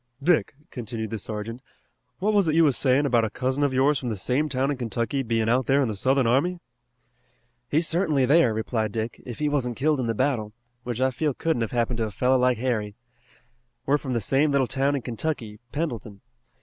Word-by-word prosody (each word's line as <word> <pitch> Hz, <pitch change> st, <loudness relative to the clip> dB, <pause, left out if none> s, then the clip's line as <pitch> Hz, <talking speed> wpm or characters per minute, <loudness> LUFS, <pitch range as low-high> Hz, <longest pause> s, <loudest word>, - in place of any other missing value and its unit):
"Dick," 165 Hz, -3 st, +2 dB, 0.2 s
continued 110 Hz, -2 st, -5 dB
the 110 Hz, -, -3 dB
sergeant, 110 Hz, +4 st, -5 dB, 0.6 s
"what 210 Hz, +4 st, 0 dB
was 200 Hz, -4 st, +3 dB
it 155 Hz, -, +1 dB
you 165 Hz, -, +6 dB
was 145 Hz, -5 st, +3 dB
sayin' 135 Hz, +2 st, +2 dB
about 120 Hz, -4 st, +3 dB
a 110 Hz, -, 0 dB
cousin 130 Hz, +5 st, -2 dB
of 145 Hz, -1 st, +2 dB
yours 135 Hz, +2 st, +2 dB
from 125 Hz, -, -4 dB
the 110 Hz, -, -3 dB
same 130 Hz, +10 st, 0 dB
town 135 Hz, +1 st, 0 dB
in 140 Hz, -, -3 dB
Kentucky 120 Hz, +2 st, -2 dB
bein' 115 Hz, -3 st, 0 dB
out 125 Hz, +2 st, +2 dB
there 140 Hz, +1 st, +4 dB
in 135 Hz, -, +2 dB
the 110 Hz, -, -3 dB
Southern 130 Hz, +5 st, +2 dB
army?" 140 Hz, +10 st, +2 dB, 1.1 s
"He's 160 Hz, +3 st, +2 dB
certainly 160 Hz, -6 st, +2 dB
there," 145 Hz, -2 st, +4 dB
replied 110 Hz, 0 st, -2 dB
Dick, 115 Hz, +1 st, -4 dB
"if 120 Hz, -, -6 dB
he 150 Hz, -, 0 dB
wasn't 130 Hz, -5 st, -1 dB
killed 150 Hz, +1 st, +1 dB
in 125 Hz, -, -1 dB
the 115 Hz, -, -1 dB
battle, 110 Hz, -5 st, 0 dB, 0.3 s
which 120 Hz, -1 st, -4 dB
I 130 Hz, 0 st, +2 dB
feel 145 Hz, +1 st, -1 dB
couldn't 160 Hz, -7 st, 0 dB
have 115 Hz, -, -1 dB
happened 120 Hz, -1 st, -1 dB
to 115 Hz, -, 0 dB
a -, -, -4 dB
fellow 125 Hz, +6 st, +2 dB
like 125 Hz, -1 st, +3 dB
Harry. 110 Hz, -4 st, -2 dB, 0.9 s
We're 145 Hz, +2 st, +2 dB
from 130 Hz, -3 st, -4 dB
the 115 Hz, -, 0 dB
same 135 Hz, +8 st, +2 dB
little 140 Hz, -2 st, +3 dB
town 135 Hz, +3 st, +1 dB
in 135 Hz, -, -3 dB
Kentucky, 115 Hz, -4 st, -4 dB
Pendleton. 120 Hz, -10 st, -4 dB
130 Hz, 215 wpm, -25 LUFS, 115-145 Hz, 1.1 s, you